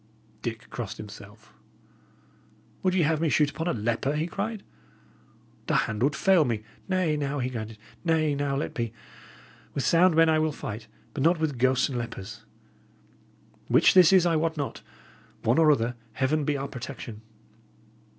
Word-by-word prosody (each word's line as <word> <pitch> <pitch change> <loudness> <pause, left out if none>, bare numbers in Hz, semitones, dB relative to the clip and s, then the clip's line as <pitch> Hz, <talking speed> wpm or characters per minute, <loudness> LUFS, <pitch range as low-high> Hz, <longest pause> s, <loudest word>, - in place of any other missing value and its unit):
Dick 115 -1 -5
crossed 115 -5 -5
himself. 105 +1 -12 1.3
"Would 185 -1 +1
ye 180 - +3
have 155 +1 +1
me 165 - +2
shoot 145 0 +3
upon 160 +3 -4
a - - +2
leper?" 120 +5 -1
he 155 +2 0
cried. 215 +5 -4 1.0
"The - - +1
hand 110 0 0
would 140 +4 +2
fail 190 -2 +4
me. 115 -5 -2 0.3
Nay, 185 -5 +1
now," 145 -1 -2
he 130 -1 -3
added 110 -1 -5 0.3
"nay, 160 -3 +2
now, 140 -1 -1
let 140 - -3
be! 115 -2 -3 0.8
With 140 - -1
sound 170 +2 +4
men 165 0 +6
I 160 -1 +3
will 155 0 +1
fight, 110 -4 -6 0.3
but 145 - -3
not 165 +3 +3
with 150 -6 -1
ghosts 130 +1 +3
and 125 -3 -3
lepers. 110 -1 -7 1.2
Which - - +5
this 180 -2 +7
is, 185 -2 +6
I 165 -2 +3
wot 160 0 -1
not. 140 -2 -4 0.6
One 120 +7 +3
or 155 -2 +6
other, 120 -4 +1 0.2
Heaven 140 +5 0
be 145 0 0
our 135 +1 -3
protection!" 120 -4 -8
140 Hz, 170 wpm, -27 LUFS, 115-160 Hz, 1.3 s, this